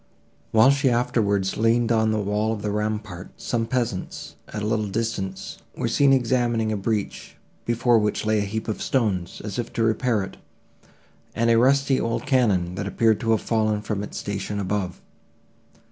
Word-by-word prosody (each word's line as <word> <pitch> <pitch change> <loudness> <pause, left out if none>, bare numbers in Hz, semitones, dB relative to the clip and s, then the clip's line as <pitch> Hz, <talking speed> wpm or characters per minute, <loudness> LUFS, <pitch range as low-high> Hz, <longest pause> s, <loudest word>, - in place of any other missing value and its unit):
While 115 +5 +6
she 140 -1 +2
afterwards 100 -5 +1
leaned 115 +1 +2
on 110 -1 +3
the 110 - 0
wall 105 +1 0
of 105 - -6
the 105 - -1
rampart, 105 -3 -4
some 115 -2 -1
peasants, 120 -7 -3
at 105 -1 -5
a - - -1
little 110 -1 0
distance, 100 -3 -4 0.2
were - - -1
seen 140 -1 +3
examining 120 -3 +1
a - - 0
breach, 105 0 -3 0.3
before 120 0 +3
which 105 0 -1
lay 110 0 +2
a 105 - 0
heap 110 +3 -4
of 110 - -3
stones, 100 -9 -1
as 105 +1 -4
if 120 - -3
to 115 - 0
repair 115 -1 +1
it, 95 - -9 1.0
and 115 0 +2
a 115 - +5
rusty 135 +2 +3
old 115 0 -2
cannon, 100 -10 +2
that 100 +2 -4
appeared 110 +1 +2
to 115 - -3
have 110 -2 +3
fallen 110 -2 0
from 105 -2 -2
its 105 - -6
station 100 0 -4
above. 95 -2 -2
110 Hz, 175 wpm, -24 LUFS, 105-115 Hz, 1.0 s, While